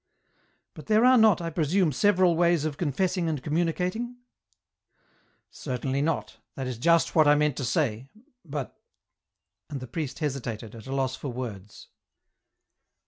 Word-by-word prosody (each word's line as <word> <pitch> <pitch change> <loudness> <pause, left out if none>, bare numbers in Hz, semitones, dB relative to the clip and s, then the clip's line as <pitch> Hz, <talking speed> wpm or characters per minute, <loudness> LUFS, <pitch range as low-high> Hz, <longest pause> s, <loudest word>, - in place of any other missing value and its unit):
" - - -42
But - - -12
there 220 +2 +4
are 255 0 +7
not, 220 -7 +5
I 165 - -3
presume, 165 +2 +1
several 185 +3 +3
ways 170 -2 +2
of 155 -2 -2
confessing 175 +3 -1
and 150 -5 -3
communicating? 180 +9 -1 0.7
" - - -63 0.6
"Certainly 130 0 -3
not, 160 +1 -2 0.2
that 135 - -4
is 125 -3 -5
just 170 +4 +3
what 155 -2 +5
1 145 0 +6
meant 150 -2 +1
to 140 - -3
say... 125 -1 -1 0.3
but.. 145 -5 -5 0.5
." 100 +7 -60
And 145 -3 -5
the 130 - -7
priest 140 +2 -5
hesitated, 125 - -4
at 115 0 -11
a 135 - -3
loss 130 -1 0
for 140 - -6
words. 105 -6 -8
150 Hz, 160 wpm, -27 LUFS, 130-170 Hz, 0.7 s, are